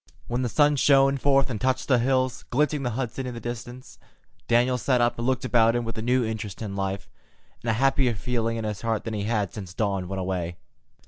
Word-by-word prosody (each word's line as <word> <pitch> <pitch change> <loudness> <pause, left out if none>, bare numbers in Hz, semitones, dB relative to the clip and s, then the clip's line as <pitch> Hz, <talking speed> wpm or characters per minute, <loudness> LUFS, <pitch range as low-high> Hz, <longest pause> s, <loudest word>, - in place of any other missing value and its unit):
When 120 +1 -1
the 125 - -1
sun 145 +3 +3
shone 135 0 +4
forth 135 0 +2
and 110 - -4
touched 130 0 0
the 130 -3 +4
hills, 130 0 +1
glinting 150 +2 +1
the 125 - -1
Hudson 130 0 -3
in 125 - -5
the - - -5
distance, 120 +2 -8 0.5
Daniel 125 +2 +3
sat 125 +2 +2
up 120 0 +1
and 120 - -1
looked 130 -1 0
about 115 -2 +4
him 120 -1 -1
with 115 - -5
a 110 - -4
new 125 +1 +2
interest 110 -2 -5
in 100 -2 -5
life, 95 0 -3 0.5
and 115 - -3
a - - +3
happier 135 0 +2
feeling 115 +2 -1
in 115 - -3
his 105 -2 -4
heart 115 -2 -1
than 115 - -4
he 105 -1 -2
had 115 +1 +1
had 100 -4 -2
since 95 -4 -8
Dawn 100 -4 -1
went 95 +1 -4
away. 90 -2 -3
120 Hz, 235 wpm, -25 LUFS, 110-130 Hz, 0.5 s, shone